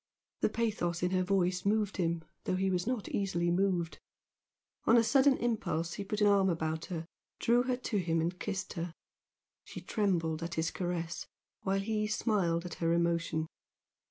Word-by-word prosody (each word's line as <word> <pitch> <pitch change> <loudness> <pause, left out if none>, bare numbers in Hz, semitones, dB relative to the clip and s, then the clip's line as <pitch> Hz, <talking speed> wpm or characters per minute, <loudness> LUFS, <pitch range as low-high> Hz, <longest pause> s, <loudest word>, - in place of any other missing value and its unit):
The - - +2
pathos 180 -7 -1
in 180 - +2
her 185 -1 +2
voice 180 -1 +1
moved 210 0 +1
him 170 -2 0 0.2
though - - +1
he 190 +1 +1
was 180 +2 0
not 250 -5 -1
easily 175 -3 0
moved. 175 -3 +1 0.9
On 230 - +6
a 230 - +6
sudden 270 +3 +5
impulse 170 -8 -1
he 200 - -4
put 210 +2 -3
an - - +6
arm 200 -2 +5
about 160 -1 -1
her, 165 -3 -4 0.3
drew 240 +1 +3
her 250 0 0
to 240 -4 -2
him 165 -3 +1
and 170 +3 -1
kissed 190 -1 -3
her. 170 -1 -4 0.7
She - - -8
trembled 170 -7 0
at 170 +1 -4
his 160 +1 0
caress, 175 -2 -3 0.3
while 195 0 0
he 215 +1 0
smiled 190 -6 +1
at 175 - -5
her 165 0 +2
emotion. 170 -2 +1
185 Hz, 175 wpm, -32 LUFS, 170-210 Hz, 0.9 s, On